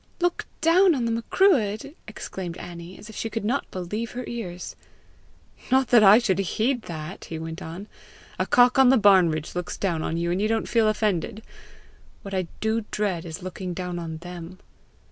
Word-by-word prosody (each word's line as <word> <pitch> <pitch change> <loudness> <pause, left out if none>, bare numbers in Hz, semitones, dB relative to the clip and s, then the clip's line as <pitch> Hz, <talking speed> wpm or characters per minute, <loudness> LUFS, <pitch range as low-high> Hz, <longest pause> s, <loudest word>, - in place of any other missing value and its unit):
"Look 350 0 0
down 340 +2 +5
on 245 -3 -1
the 230 - 0
Macruadh!" 230 - +2
exclaimed 180 -2 -6
Annie, 175 +1 -9
as 210 - -12
if 220 - -11
she 225 - -3
could 225 -1 -4
not 255 +6 -1
believe 205 +6 -4
her 250 +1 -4
ears. 185 -7 -6 0.9
"Not 260 0 +3
that 240 -3 +7
I 205 +1 +9
should 195 -6 +1
heed 225 +6 0
that!" 160 +2 -7
he 160 - -6
went 160 +2 -6
on. 170 +5 -7 0.5
"A - - 0
cock 245 +1 +5
on 265 -2 +7
the 265 - +6
barn 195 -5 +6
ridge 155 0 -4
looks 180 0 -4
down 170 -5 -1
on 160 - -2
you, 170 0 -1
and 180 +3 0
you 215 - +2
don't 225 0 0
feel 225 -2 +3
offended! 215 -1 -1 0.8
What 195 - -7
I 185 -2 -1
do 220 +1 0
dread 195 -6 -1
is 165 +1 -7
looking 185 -1 -5
down 180 -1 -4
on 165 -2 -5
them. 175 +1 -9
200 Hz, 190 wpm, -25 LUFS, 175-230 Hz, 0.9 s, I